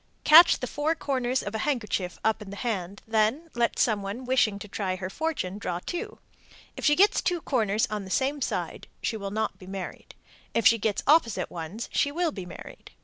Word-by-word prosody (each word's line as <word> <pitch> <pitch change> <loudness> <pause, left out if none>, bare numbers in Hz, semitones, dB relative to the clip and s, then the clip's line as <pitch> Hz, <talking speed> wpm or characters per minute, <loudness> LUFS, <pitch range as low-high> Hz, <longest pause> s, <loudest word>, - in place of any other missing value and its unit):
Catch 335 +3 +8
the - - -1
four 295 +5 -1
corners 260 -4 -1
of 205 - -5
a 220 - -2
handkerchief 215 -9 -2
up 220 0 +1
in 205 - -8
the 200 - -7
hand, 200 -5 -4
then 225 +9 0
let 235 -1 0
some 215 -4 +2
one 205 +6 -5
wishing 245 -5 +2
to 205 - -9
try 190 -2 -2
her 185 0 -5
fortune 285 - -3
draw 180 -3 -3
two. 390 - -5 0.6
If - - -8
she 295 - +5
gets 405 +5 +4
two 355 -2 0
corners 220 -8 +1
on 210 -1 -3
the 190 - -9
same 275 +7 0
side, - - -3 0.2
she 225 - -1
will 200 -2 -4
not 220 +2 -2
be 185 - -12
married. 190 -2 -7 0.4
If 230 - +1
she 230 +2 +6
gets 210 -1 -1
opposite 230 - +3
ones, 175 +7 -6
she 285 - +2
will 335 +1 0
be 190 -8 -7
married. 175 - -11
220 Hz, 205 wpm, -27 LUFS, 200-285 Hz, 0.6 s, Catch